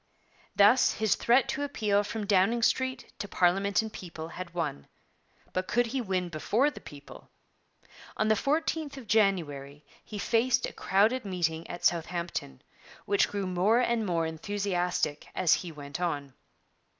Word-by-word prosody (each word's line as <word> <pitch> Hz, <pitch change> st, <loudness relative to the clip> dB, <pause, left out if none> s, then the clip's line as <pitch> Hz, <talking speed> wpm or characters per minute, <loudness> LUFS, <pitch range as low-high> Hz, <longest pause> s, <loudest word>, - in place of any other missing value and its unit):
Thus 210 Hz, +5 st, +5 dB
his 220 Hz, -2 st, +1 dB
threat 245 Hz, +2 st, +3 dB
to 270 Hz, +2 st, -2 dB
appeal 210 Hz, -8 st, +1 dB
from 210 Hz, +1 st, -4 dB
Downing 205 Hz, +4 st, +3 dB
Street 260 Hz, +2 st, 0 dB
to 205 Hz, -, -4 dB
parliament 195 Hz, +4 st, +2 dB
and 220 Hz, -, -7 dB
people 165 Hz, -3 st, -8 dB
had 185 Hz, 0 st, -7 dB
won; 160 Hz, -, -4 dB, 0.7 s
but 185 Hz, 0 st, -2 dB
could 245 Hz, +1 st, +2 dB
he 255 Hz, +3 st, -2 dB
win 185 Hz, -5 st, -1 dB
before 220 Hz, -, +1 dB
the -, -, -11 dB
people? 145 Hz, -2 st, -12 dB, 0.9 s
On 215 Hz, -, +1 dB
the 215 Hz, -, +5 dB
14th 300 Hz, +4 st, -1 dB
of 265 Hz, -, -9 dB
January 150 Hz, -10 st, 0 dB, 0.2 s
he 215 Hz, -, -8 dB
faced 235 Hz, +4 st, +2 dB
a -, -, -7 dB
crowded 215 Hz, +7 st, +2 dB
meeting 170 Hz, -4 st, -2 dB
at 175 Hz, -, -6 dB
Southampton, 170 Hz, -, -1 dB, 0.4 s
which 200 Hz, 0 st, +3 dB
grew 200 Hz, -1 st, -3 dB
more 185 Hz, +5 st, +2 dB
and 235 Hz, -2 st, +1 dB
more 170 Hz, -4 st, 0 dB
enthusiastic 180 Hz, -2 st, -2 dB
as 175 Hz, -, +4 dB
he 175 Hz, -, -2 dB
went 145 Hz, +2 st, -7 dB
on. 145 Hz, -6 st, -2 dB
195 Hz, 150 wpm, -29 LUFS, 170-225 Hz, 0.9 s, Thus